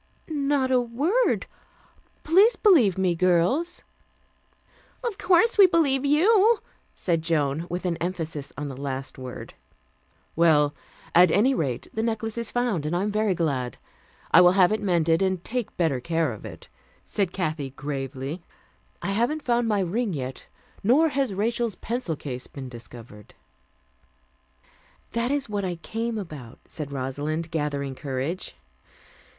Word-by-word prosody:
"Not 280 -2 +1
a 250 -1 +4
word. 295 - +1 0.8
Please 390 +9 +5
believe 270 - +4
me, 185 -2 +2
girls." 185 - +1 1.2
"Of 455 -5 -3
course 380 +4 +3
we 390 - +10
believe 285 -6 +2
you," 400 +10 +4 0.4
said 170 -3 0
Joan, 160 -1 0
with 180 +2 -4
an 170 -2 0
emphasis 160 -5 -4
on 145 +1 -4
the 135 - -6
last 135 -1 -5
word. 130 -1 -8 0.8
"Well, 150 -3 +4 0.4
at 180 +1 +7
any 220 +11 +3
rate, 135 - -2
the 220 - -1
necklace 225 -1 -2
is 235 - -4
found, 235 -11 -1
and 165 - -1
I 180 - +1
am 210 - -1
very 210 -2 +1
glad. 135 -7 -1 0.5
I 175 - +8
will 180 0 +6
have 185 -1 +5
it 215 - 0
mended, 170 -4 +2
and 190 -2 0
take 240 -2 -4
better 160 -7 +1
care 160 +1 0
of 105 - -11
it," - - -10 0.4
said 195 -4 -1
Kathy 155 -7 -2
gravely. 135 +3 -5 0.6
"I 185 - -1
haven't 240 +9 0
found 240 -1 +1
my 210 -3 +1
ring 200 +3 -1
yet, 130 -3 -6 0.4
nor 280 +10 +4
has 275 -4 0
Rachel's 230 +2 -1
pencil 230 -8 -3
case 130 -3 -6
been 135 -2 -8
discovered." 115 -3 -12 1.8
"That 235 +2 -1
is 280 -1 0
what 205 -2 -2
I 180 -2 -2
came 225 +6 -4
about," 150 - -8
said 150 -3 -6
Rosalind, 145 +5 -3
gathering 145 -3 -2
courage. 135 - -4
180 Hz, 145 wpm, -25 LUFS, 150-240 Hz, 1.8 s, we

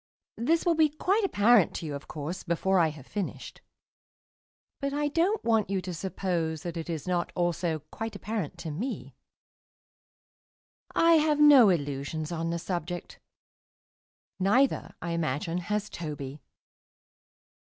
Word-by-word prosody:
This 320 +10 +2
will 345 - +4
be 315 -1 +4
quite 380 +8 +1
apparent 220 - +4
to - - -4
you, 150 - -4
of 140 +1 -7
course, 155 +4 -5
before 185 +2 +1
I 165 - +5
have 150 -4 -8
finished, 200 +2 -5 1.2
but 280 0 -2
I 295 0 0
don't 355 +8 +1
want 225 -3 +2
you 195 -1 0
to 180 0 -5
suppose 170 -3 -2
that 175 -1 -5
it 165 0 -5
is 160 -3 -4
not 175 -1 0
also 175 -3 -1
quite 225 0 -5
apparent 210 -8 -4
to 160 - -4
me. 220 - -4 1.8
I 330 0 +6
have 300 -1 +2
no 285 -7 +8
illusions 150 0 -2
on 165 -1 -2
the 170 - -1
subject; 175 0 -5 1.2
neither, 235 +9 +2
I 170 - -3
imagine, 165 +1 -1
has 210 +3 -2
Toby. 150 -6 -6
180 Hz, 140 wpm, -28 LUFS, 160-240 Hz, 1.8 s, no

